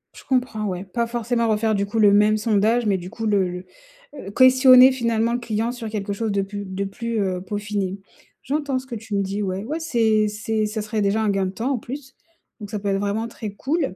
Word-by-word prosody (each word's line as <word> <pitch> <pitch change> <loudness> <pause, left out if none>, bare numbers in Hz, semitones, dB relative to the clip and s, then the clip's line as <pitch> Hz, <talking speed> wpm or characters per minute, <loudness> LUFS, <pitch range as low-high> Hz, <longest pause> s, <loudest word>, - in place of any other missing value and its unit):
Je - - -13
comprends, 250 -5 -1
ouais, 185 -2 -3
pas 235 +5 -2
forcément 235 0 -1
refaire, 220 0 +1
du 200 0 0
coup, 215 +3 -3
le 205 -2 +6
même 210 +1 +4
sondage 220 +2 +2
mais 200 -2 +2
du 180 0 -8
coup 225 +3 -6
le 200 -3 +2
le 180 +1 -7 0.6
heu, 200 - -6
questionner 255 +1 +7
finalement 230 -2 0
le 240 - 0
client 230 0 -2
sur 235 -3 -6
quelque 205 -2 -3
chose 215 +1 -2
de 200 - +1
plus 200 +1 -6
de 190 +1 -3
plus, 230 +3 -3
heu, 185 -2 -1
peaufiné. 200 0 -3 0.4
J'entends 280 -1 -1
ce 260 - -13
que 240 - -6
tu 220 -1 -5
me 200 - +2
dis. 195 +2 -2
Ouais, 190 +1 -3
ouais, 305 +7 -3
c'est 225 -9 +2
c'est 215 +1 -2
ça 215 +1 -3
serait 215 0 -2
déjà 200 +2 +1
un 215 - +1
gain 195 -1 +1
de - - -4
temps, 230 +7 -2
en - - -1
plus, 270 +3 -8 0.4
donc 205 -2 -8
ça 210 - -3
peut 200 0 -2
être 195 0 +1
vraiment 205 +3 -1
très 220 -2 -7
cool. 275 - -2
215 Hz, 240 wpm, -22 LUFS, 200-235 Hz, 0.6 s, questionner